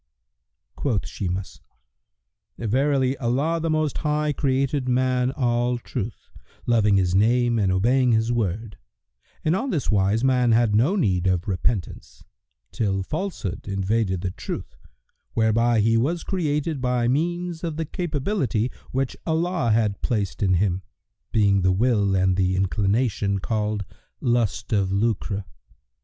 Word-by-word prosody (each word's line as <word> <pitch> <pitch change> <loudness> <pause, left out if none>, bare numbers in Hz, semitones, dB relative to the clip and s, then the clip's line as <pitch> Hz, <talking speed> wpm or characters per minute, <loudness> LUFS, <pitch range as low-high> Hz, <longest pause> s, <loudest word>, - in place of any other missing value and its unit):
Quoth 120 -9 -1
Shimas, 95 0 -4 1.0
"Verily 130 +3 +1
Allah 140 +7 0
the 165 0 -2
Most 155 -2 0
High 150 -1 0
created 135 -1 0
man 125 0 +2
all 120 -1 +1
Truth[FN#123], 115 -2 -4 0.5
loving 105 -4 +3
His 90 -2 +1
name 120 +4 +3
and 95 -3 +2
obeying 125 +7 +3
His 110 +1 +2
word, 110 -1 -2 0.7
and 155 +3 +3
on 265 +8 -2
this 155 - -1
wise 100 +3 +2
man 125 -3 +3
had 115 -2 +3
no 130 - +3
need 95 - +1
of 90 -1 0
repentance 90 - -3 0.5
till 95 -4 -1
Falsehood 155 - -4
invaded 100 -1 0
the 90 -1 -2
Truth 65 -8 -6 0.6
whereby 115 +1 +3
he 115 +2 +3
was 160 +9 0
created 150 -5 -1
by 125 -2 +1
means 170 +5 -1
of 165 -3 -3
the 160 - -1
capability[FN#124] 145 - -1 0.2
which 135 0 -2
Allah 165 -5 0
had 110 -2 +1
placed 105 -7 -2
in 95 -3 +3
him, 95 0 +1 0.5
being 100 -3 +3
the 95 +1 +3
will 100 -1 +2
and 95 0 +2
the 95 -1 +2
inclination 100 +2 +1
called 105 0 -2 0.3
lust 115 -3 0
of 100 -3 +1
lucre. 100 -1 -1
115 Hz, 135 wpm, -24 LUFS, 100-135 Hz, 1.0 s, loving